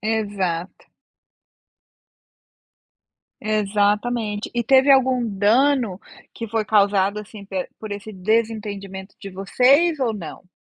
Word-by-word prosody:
Exato. 200 -5 -3 2.5
Exatamente. 210 +1 0
E 240 - 0
teve 265 +3 +5
algum 260 -2 +4
dano 220 +1 +2 0.3
que 230 -2 -7
foi 225 0 -1
causado, 200 -1 +2
assim, 210 -1 -10
pe 190 -2 -4
por 215 -2 -7
esse 205 +2 -7
desentendimento 200 -1 -2
de 195 - -8
vocês 270 - +3
ou 235 -4 +1
não? 180 -2 -9
210 Hz, 100 wpm, -22 LUFS, 200-235 Hz, 2.5 s, teve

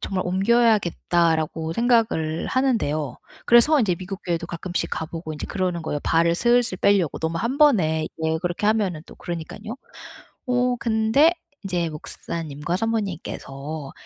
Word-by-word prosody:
정말 190 -2 -2
옮겨야겠다.'라고 175 -6 +2
생각을 225 -10 +1
하는데요. 155 - 0 0.3
그래서 260 +6 +6
인제 205 -8 +2
미국 190 +2 -7
교회도 170 -1 -2
가끔씩 175 +1 -3
가 - - -2
보고 160 0 -6
인제 150 - -6
그러는 180 -3 -2
거예요 150 -2 -3
발을 170 +1 +3
슬슬 240 -1 +2
뻬려고. 195 -6 +2
너무 160 +1 -2
1 235 +8 -2
번에 165 - +4 0.2
예 160 0 +1
그렇게 175 +4 -2
하면은 200 -8 +1
또 - - -13
그러니까는요. 175 +7 -6 0.7
어 250 0 +2
근데 230 +9 +3 0.3
인제 175 -3 -1
목사님과 155 +1 -5
사모님께서 160 -9 -4
180 Hz, 335 characters per minute, -23 LUFS, 160-225 Hz, 0.7 s, 그래서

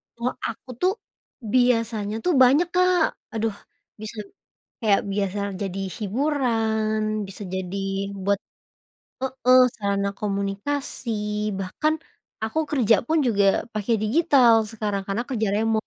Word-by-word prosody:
kalau 235 +2 -2
aku 230 +2 -8
tuh 370 - +4 0.6
biasanya 230 -4 +2
tuh 360 - +3
banyak 285 +7 +5
Kak. 365 -2 +4 0.3
Aduh, 225 -2 -1 0.5
bisa 215 +1 -7 0.6
kayak 210 -4 +3
biasa 200 0 -1 0.2
jadi 195 -1 -3 0.2
hiburan, 225 -2 0 0.3
bisa 195 +2 -9
jadi 190 0 -3 0.5
buat 200 +1 +1 0.8
heeh, 255 -1 +3 0.2
sarana 200 -1 -1
komunikasi, 205 +7 -3 0.5
bahkan 195 +11 0 0.5
aku 220 +8 -2
kerja 235 -6 +4
pun 320 +4 +2
juga 205 -4 +3 0.3
pakai 215 +2 0
digital 250 0 +5 0.2
sekarang 210 -3 -2
karena 200 +4 -1
kerja 220 -5 0
remote. 220 0 0
225 Hz, 115 wpm, -24 LUFS, 200-255 Hz, 0.8 s, banyak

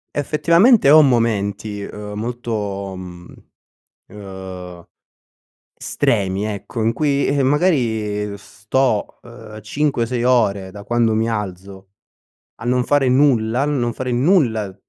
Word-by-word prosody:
effettivamente 170 - +4
ho 155 +1 +8
momenti, 105 -6 0
ehm, 105 +1 -8
molto, 105 -5 -4
mhmm 90 -1 -10 0.7
ehm, 95 -3 -9 1.0
stremi 95 +1 -1
ecco, 110 +2 -5
in 115 - +2
cui 140 0 0
eh, 140 -1 +1
magari 110 - 0
sto, 105 +3 -2
ehm, 110 -3 -12
cinque, 120 +1 -1
sei 120 0 -2
ore 100 -7 +1
da 100 +1 -10
quando 120 0 +1
mi 110 +1 0
alzo 95 -2 -6 0.7
a - - -7
non 125 0 +1
fare 140 -2 +2
nulla, 125 -2 +2
a - - 0
non 130 -5 -1
fare 125 +1 -4
nulla, 120 - +1
110 Hz, 120 wpm, -19 LUFS, 100-130 Hz, 1.0 s, ho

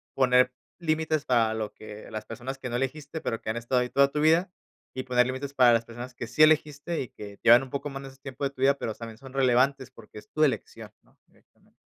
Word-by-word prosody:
poner 125 -1 +4 0.3
límites 155 -2 0
para 115 -3 +2
lo 110 -1 -4
que 105 0 -11
las 110 0 -6
personas 125 +4 -6
que 125 - -5
no 120 - -3
elegiste, 145 +4 -3
pero 115 - -3
que - - -6
han 115 - -2
estado 125 +2 0
ahí 125 - -2
toda 140 0 +3
tu 150 - -2
vida, 165 +4 +3 0.4
y 130 - -4
poner 125 -1 +2
límites 135 +2 -5
para 125 -2 +6
las 115 0 +1
personas 120 +2 -9
que 115 - -6
sí 155 +5 +3
elegiste 155 +1 +2
y 125 - -5
que 100 -1 -11
llevan 120 +3 +7
un 130 - -9
poco 140 +1 -4
más 135 0 -7
en 135 - -8
ese 135 - -17
tiempo 135 0 -8
de 135 - +1
tu 130 - -12
vida, 140 +1 +5
pero 110 - -3
también 115 -1 -9
son 135 +1 -13
relevantes 130 0 +2
porque 105 - -13
es - - -18
tu 155 - +1
elección, 140 - -2
¿no?, - - -30
directamente. - - -30
130 Hz, 250 wpm, -27 LUFS, 120-140 Hz, 0.4 s, llevan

